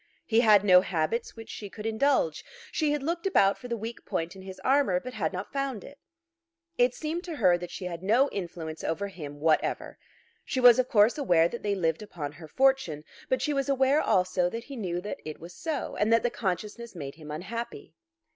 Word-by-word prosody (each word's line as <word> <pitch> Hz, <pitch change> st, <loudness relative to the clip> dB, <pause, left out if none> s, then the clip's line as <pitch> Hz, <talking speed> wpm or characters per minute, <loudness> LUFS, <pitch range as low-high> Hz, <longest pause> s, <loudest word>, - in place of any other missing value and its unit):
He 225 Hz, 0 st, +3 dB
had 215 Hz, -4 st, +6 dB
no 180 Hz, -3 st, +7 dB
habits 185 Hz, +6 st, -2 dB
which 225 Hz, -1 st, -9 dB
she 205 Hz, -, -7 dB
could 210 Hz, +2 st, -9 dB
indulge. 280 Hz, -, +1 dB, 0.3 s
She 310 Hz, -2 st, +1 dB
had 295 Hz, -2 st, -1 dB
looked 335 Hz, +4 st, -1 dB
about 200 Hz, -, +4 dB
for 250 Hz, -, -8 dB
the 235 Hz, -1 st, -2 dB
weak 225 Hz, +2 st, -7 dB
point 165 Hz, +3 st, -3 dB
in 190 Hz, -, -10 dB
his 190 Hz, 0 st, -9 dB
armour, 265 Hz, -9 st, +3 dB
but 255 Hz, +6 st, -8 dB
had 180 Hz, -9 st, -1 dB
not 185 Hz, +2 st, -6 dB
found 275 Hz, -6 st, -2 dB
it. 285 Hz, -, -13 dB, 0.8 s
It 245 Hz, 0 st, +3 dB
seemed 325 Hz, +3 st, -3 dB
to 340 Hz, -3 st, -5 dB
her 185 Hz, -10 st, +4 dB
that 175 Hz, 0 st, -6 dB
she 180 Hz, +2 st, -7 dB
had 170 Hz, -2 st, -5 dB
no 230 Hz, +9 st, +4 dB
influence 165 Hz, -4 st, -6 dB
over 200 Hz, +5 st, -2 dB
him 145 Hz, -6 st, -9 dB
whatever. 155 Hz, +1 st, 0 dB, 0.4 s
She 260 Hz, -, -2 dB
was 245 Hz, -1 st, +8 dB
of 255 Hz, -, +1 dB
course 215 Hz, +6 st, +4 dB
aware 175 Hz, -, +4 dB
that 235 Hz, -, -7 dB
they 205 Hz, -1 st, 0 dB
lived 165 Hz, -2 st, 0 dB
upon 160 Hz, -8 st, -6 dB
her 155 Hz, +2 st, -12 dB
fortune; 265 Hz, -, +2 dB, 0.3 s
but 260 Hz, -, +1 dB
she 300 Hz, -, 0 dB
was 275 Hz, 0 st, -1 dB
aware 275 Hz, +2 st, +3 dB
also 180 Hz, -1 st, +2 dB
that 230 Hz, +4 st, -5 dB
he 275 Hz, +2 st, -9 dB
knew 180 Hz, -6 st, -3 dB
that 205 Hz, -, -5 dB
it 155 Hz, -1 st, -7 dB
was 170 Hz, +1 st, -10 dB
so, 300 Hz, -, -4 dB
and 210 Hz, +2 st, +1 dB
that 230 Hz, -, +4 dB
the 240 Hz, -, +1 dB
consciousness 210 Hz, +3 st, -4 dB
made 140 Hz, -4 st, -6 dB
him 155 Hz, -1 st, -12 dB
unhappy. 200 Hz, +10 st, -6 dB
210 Hz, 215 wpm, -28 LUFS, 175-255 Hz, 0.8 s, was